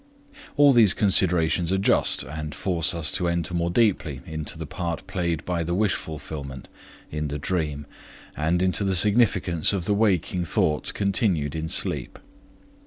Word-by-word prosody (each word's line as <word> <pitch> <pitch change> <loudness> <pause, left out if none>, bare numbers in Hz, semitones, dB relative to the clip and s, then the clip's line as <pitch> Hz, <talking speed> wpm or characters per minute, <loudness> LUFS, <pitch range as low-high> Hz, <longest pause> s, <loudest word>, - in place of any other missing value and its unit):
All 145 -1 +6
these 110 -6 +5
considerations 90 -3 +2
are 95 - +2
just, 95 - +2
and 75 +2 -6
force 85 -2 0
us 80 -3 -1
to 90 - 0
enter 85 0 -2
more 85 0 0
deeply 90 - +1
into 80 0 -5
the 80 - -5
part 85 +2 -5
played 85 -5 -2
by 90 -2 -1
the 85 +2 -2
wish 105 0 +2
fulfillment 70 -4 -7 0.4
in 75 0 -3
the 75 +1 -4
dream, 75 -2 -2 0.5
and 85 +4 0
into 95 +2 +1
the 95 -1 +1
significance 100 -4 +3
of 95 -3 -2
the 105 - +1
waking 95 -4 +1
thoughts 85 - 0
continued 95 - 0
in 80 0 -3
sleep. - - -3
85 Hz, 160 wpm, -24 LUFS, 80-95 Hz, 0.5 s, All